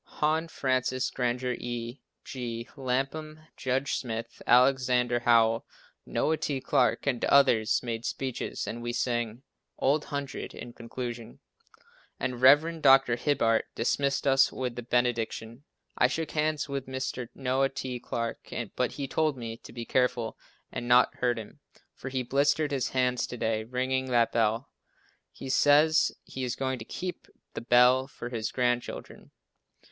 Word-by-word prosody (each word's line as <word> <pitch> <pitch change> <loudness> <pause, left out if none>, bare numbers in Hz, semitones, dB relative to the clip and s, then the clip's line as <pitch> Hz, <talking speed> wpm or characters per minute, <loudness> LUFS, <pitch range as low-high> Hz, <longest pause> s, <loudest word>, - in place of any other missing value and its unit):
Hon. 160 +2 +1
Francis 130 -3 -1
Granger, 125 0 -1
E. 120 +1 -5 0.2
G. 120 -2 -5
Lapham, 140 +4 -3
Judge 130 +1 -1
Smith, 115 -1 -5
Alexander 125 -1 +4
Howell, 115 -2 +4 0.4
Noah 160 +1 +1
T. 140 -3 -2
Clarke 130 -1 +1
and 130 -4 0
others 125 -6 +4
made 115 -2 -4
speeches 130 0 -3
and 120 - -5
we 120 0 -3
sang 120 0 -2 0.3
"Old 145 +3 +1
Hundred" 140 -1 -5
in 120 - -9
conclusion, 120 -1 -7 0.8
and 125 -1 -3
Rev. 155 +5 +5
Dr. 135 -3 +6
Hibbard 115 -4 +2
dismissed 140 +4 0
us 135 -1 +4
with 125 -2 -4
the 120 - -4
benediction. 120 +1 -1 0.3
I 125 - +4
shook 160 +4 -3
hands 155 -1 0
with 140 -2 -4
Mr. 130 -2 -4
Noah 135 0 +1
T. 130 -2 -5
Clarke, 115 -1 -4 0.3
but 125 -2 0
he 140 -2 -4
told 155 0 0
me 115 -2 -5
to - - -13
be 120 -1 -6
careful 125 -3 0 0.4
and 120 - -5
not 125 +1 +5
hurt 120 -1 +1
him, 115 +6 -9 0.3
for 135 - -7
he 130 -1 -2
blistered 145 +4 +1
his 135 -3 0
hands 125 -1 +1
to 125 - -7
day 110 -1 -1
ringing 130 +2 -1
that 120 -2 +2
bell. 115 +3 0 0.6
He 135 - -9
says 145 +4 +4
he 130 - -6
is 125 -2 -2
going 130 -1 -2
to 110 - -8
keep 180 +7 -6 0.3
the - - -5
bell 125 +2 +5
for 120 -3 -8
his 115 -3 -3
grandchildren. 120 -1 -2
125 Hz, 150 wpm, -28 LUFS, 120-135 Hz, 0.8 s, Dr